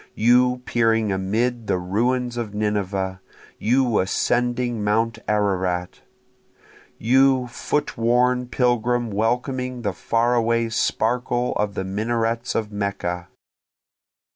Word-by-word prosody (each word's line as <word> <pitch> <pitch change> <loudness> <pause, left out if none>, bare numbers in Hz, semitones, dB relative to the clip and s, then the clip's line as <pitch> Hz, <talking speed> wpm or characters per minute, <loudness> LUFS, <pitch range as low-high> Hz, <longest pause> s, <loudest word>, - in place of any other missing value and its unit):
you 125 +2 +3
peering 115 -3 +2
amid 110 +5 -1
the - - +1
ruins 120 +7 -1
of 110 -4 -4
Nineveh! 100 -3 -2 0.4
you 120 0 +2
ascending 120 +4 0
mount 110 +2 0
Ararat! 95 -4 -1 1.0
You 130 +2 +3
foot 125 +2 -3
worn 125 +2 +2
pilgrim 120 -1 +1
welcoming 125 +3 -1
the 100 -3 -1
far 115 +6 +1
away 115 -1 +1
sparkle 120 +2 0
of 105 -2 -2
the - - -2
minarets 115 +4 -1
of 110 -2 -1
Mecca! 100 -4 -3
115 Hz, 105 wpm, -22 LUFS, 105-125 Hz, 1.0 s, you